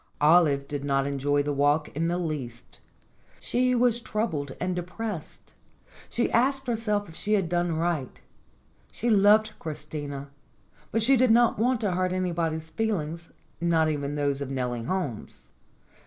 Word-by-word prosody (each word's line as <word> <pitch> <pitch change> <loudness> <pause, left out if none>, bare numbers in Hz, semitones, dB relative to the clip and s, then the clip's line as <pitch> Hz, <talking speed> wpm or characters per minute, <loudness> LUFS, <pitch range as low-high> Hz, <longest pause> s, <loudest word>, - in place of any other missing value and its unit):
Olive 150 -3 +4
did 145 -1 -4
not 135 -1 +1
enjoy 140 +1 0
the 145 0 -1
walk 145 +2 +2
in 165 +3 -2
the 175 +1 0
least. 145 -9 -5 0.6
She 250 +1 +1
was 240 -1 +3
troubled 165 - -2
and 180 0 -1
depressed. 180 0 -6 0.6
She 240 - 0
asked 265 +3 +2
herself 220 -4 -1
if 165 - -12
she 210 +5 -2
had 195 -5 +2
done 175 -1 0
right. 160 -6 -2 0.7
She 235 +1 -1
loved 215 +1 +5
Christina, 145 -3 -6 0.6
but 225 - +1
she 270 +4 +5
did 255 0 +4
not 235 -1 +4
want 245 +1 +2
to 205 -4 0
hurt 185 0 0
anybody's 165 -3 -2
feelings 170 -5 -2 0.3
not 165 -2 +3
even 145 -1 -2
those 145 -1 0
of 140 - -4
Nellie 125 -3 -3
Holmes. 145 - -4
170 Hz, 150 wpm, -27 LUFS, 145-215 Hz, 0.7 s, loved